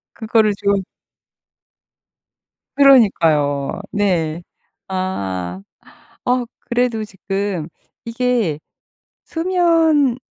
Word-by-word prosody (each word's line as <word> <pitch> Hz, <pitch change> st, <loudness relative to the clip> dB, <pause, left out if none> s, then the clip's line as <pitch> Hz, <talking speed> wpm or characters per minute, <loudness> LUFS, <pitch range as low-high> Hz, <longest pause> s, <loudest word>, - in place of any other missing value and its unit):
그거를 220 Hz, -1 st, +2 dB
좀 200 Hz, -1 st, 0 dB, 1.9 s
그러니까요. 165 Hz, -, +3 dB
네. 175 Hz, -5 st, 0 dB, 0.5 s
아 95 Hz, -, -3 dB, 0.7 s
어 250 Hz, 0 st, +2 dB
그래도 240 Hz, -2 st, -1 dB
지금 195 Hz, -4 st, -4 dB, 0.4 s
이게 230 Hz, -, 0 dB, 0.7 s
수면 325 Hz, -6 st, +2 dB
205 Hz, 120 characters per minute, -19 LUFS, 165-250 Hz, 1.9 s, 그러니까요